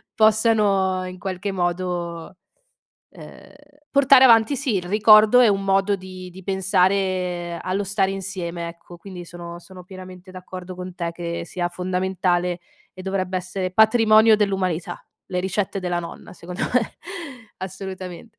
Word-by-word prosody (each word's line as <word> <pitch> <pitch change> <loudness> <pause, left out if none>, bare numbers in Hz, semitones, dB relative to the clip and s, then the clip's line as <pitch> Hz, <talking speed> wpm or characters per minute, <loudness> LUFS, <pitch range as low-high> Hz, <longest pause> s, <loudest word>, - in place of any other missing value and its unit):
possano 210 -4 +3
in 185 0 -8
qualche 195 +1 -4
modo, 175 -1 -3 0.8
ehm, - - -14 0.4
portare 275 -1 +6
avanti 230 +3 +5
sì, 265 -6 -1
il 185 - -1
ricordo 215 +4 +6
è 240 - +6
un 195 -1 0
modo 195 +1 +2
di 185 -1 -10
di 190 +2 -12
pensare 185 -2 0
allo 195 +2 -2
stare 195 0 0
insieme, 180 -3 -5
ecco. 170 +1 -12
Quindi 180 -2 -9
sono 170 0 -9
sono 185 0 -13
pienamente 185 0 -11
d'accordo 185 0 -9
con 180 0 -8
te, 170 -1 -3
che 170 0 -5
sia 175 0 -3
fondamentale, 180 -1 -1 0.3
e - - -12
dovrebbe 190 -1 -2
essere 185 0 -4
patrimonio 220 +1 +5
dell'umanità. 190 -5 -1 0.2
Le 180 -2 -3
ricette 190 +1 -2
della 175 -1 -2
nonna 170 - -10
secondo 180 +1 -7
me. 250 - +4 0.8
Assolutamente. 190 +2 -8
185 Hz, 135 wpm, -22 LUFS, 180-200 Hz, 0.8 s, portare